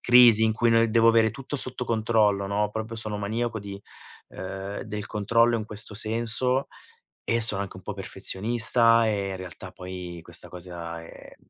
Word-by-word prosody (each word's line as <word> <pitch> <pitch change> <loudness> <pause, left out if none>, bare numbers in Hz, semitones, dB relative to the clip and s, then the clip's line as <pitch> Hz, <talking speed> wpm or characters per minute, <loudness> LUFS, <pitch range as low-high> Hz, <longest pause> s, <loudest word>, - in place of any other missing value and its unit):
crisi 120 -3 +7
in 110 - +2
cui 115 +2 +1
noi 115 0 +3
devo 115 0 +4
avere 115 -1 +4
tutto 135 +6 -6
sotto 125 -1 0
controllo, 110 -3 +1
no 105 +1 0
proprio 110 +1 -5
sono 110 -1 -3
maniaco 110 +3 -2
di, 100 -1 -8 0.5
ehm, 95 +2 -7
del 105 -1 -6
controllo 115 +3 +2
in 110 - -4
questo 105 0 -3
senso, 115 +5 +1 0.6
e 115 0 0
sono 105 -3 +5
anche 95 -2 -10
un 95 - -11
po' 105 - -5
perfezionista. 115 +4 +2
E 100 -2 -1
in 95 - -5
realtà 95 0 -9
poi 90 -1 -8
questa 85 0 -3
cosa 85 -2 -7
è - - -14
110 Hz, 170 wpm, -25 LUFS, 95-115 Hz, 0.6 s, crisi